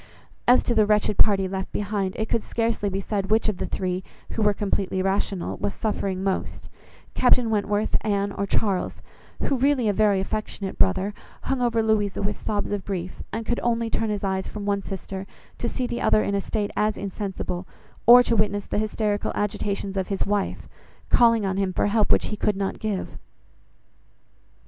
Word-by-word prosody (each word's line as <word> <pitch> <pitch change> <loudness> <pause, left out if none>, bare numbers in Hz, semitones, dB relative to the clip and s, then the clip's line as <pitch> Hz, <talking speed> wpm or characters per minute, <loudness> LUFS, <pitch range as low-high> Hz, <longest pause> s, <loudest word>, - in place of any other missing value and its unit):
As 245 +1 +6
to 240 - +1
the 215 -2 +4
wretched 210 -1 +2
party 195 -3 +4
left 190 0 -4
behind, 200 -2 -2
it 220 - -1
could 230 - 0
scarcely 225 -3 -1
be 195 0 -2
said 195 -1 -2
which 220 +1 +3
of 210 -4 0
the - - -3
three, 185 0 -2 0.3
who 225 - -2
were 210 -1 +5
completely 195 -2 -1
rational, 195 -1 -1
was 205 - -2
suffering 195 -3 -2
most: 195 -1 -2 0.4
Captain 245 -2 +4
Wentworth, 210 0 0
Anne, 200 -1 0
or 200 0 -3
Charles, 195 -2 0 0.4
who, 275 - +1
really 265 -2 +2
a 205 - +3
very 205 -1 +3
affectionate 200 -1 -4
brother, 190 +2 +2 0.3
hung 270 -2 -1
over 230 -2 +2
Louisa 210 -3 +1
with 205 +1 -2
sobs 205 -1 -1
of 205 -2 -2
grief, 185 -2 -4
and 225 0 -3
could 240 +1 0
only 230 -1 0
turn 225 - 0
his 205 -1 -2
eyes 190 -1 -1
from 210 -1 -6
one 200 -1 +1
sister, 195 0 -6 0.3
to 235 - -1
see 255 - -2
the 240 -1 -3
other 215 - +4
in 200 - -1
a 200 - +1
state 210 0 -2
as 215 0 +1
insensible, 190 -2 -4 0.4
or 245 +1 +10
to 235 - +1
witness 205 -1 +1
the - - -1
hysterical 210 -1 -1
agitations 200 -1 -2
of 190 - -1
his 195 -1 -1
wife, 205 0 -1 0.4
calling 230 -3 +5
on 190 0 -1
him 195 -1 +1
for - - 0
help 210 +1 +2
which - - +3
he 210 - -3
could 210 0 0
not 195 -1 -2
give. 210 -3 -3
205 Hz, 190 wpm, -25 LUFS, 195-220 Hz, 0.4 s, or